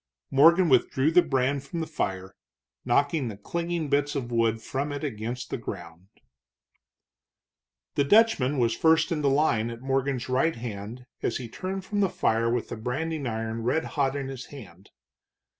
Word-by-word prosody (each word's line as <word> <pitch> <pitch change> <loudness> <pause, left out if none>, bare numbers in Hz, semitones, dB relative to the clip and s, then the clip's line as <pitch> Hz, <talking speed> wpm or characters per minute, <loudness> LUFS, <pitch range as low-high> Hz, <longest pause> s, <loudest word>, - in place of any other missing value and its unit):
Morgan 170 +6 +6
withdrew 135 +2 +3
the 180 +2 +6
brand 135 -1 0
from 140 +5 -5
the 160 - -1
fire, 95 -11 -4 0.5
knocking 145 -1 +1
the 105 -3 -6
clinging 170 +7 -3
bits 145 +1 +1
of 125 -4 -3
wood 115 -1 +1
from 135 +6 -3
it 145 +1 -5
against 120 -1 -4
the - - -2
ground. 85 -3 -8 1.9
The 140 - +2
Dutchman 150 - +4
was 115 -2 +2
first 160 +1 +3
in 155 -2 0
the 140 - +3
line 135 -6 +2
at 115 0 -8
Morgan's 135 -1 -1
right 135 +6 +1
hand 115 +1 -7 0.2
as - - -1
he 125 - -6
turned 190 +9 -5
from 205 +1 -2
the 195 -2 +3
fire 115 -11 +1
with 120 -1 -2
the - - -5
branding 140 +5 -3
iron 115 0 -3
red 125 +8 0
hot 140 -2 +1
in 140 -2 -3
his 135 -2 -7
hand. 100 -9 -13
135 Hz, 170 wpm, -27 LUFS, 115-155 Hz, 1.9 s, Morgan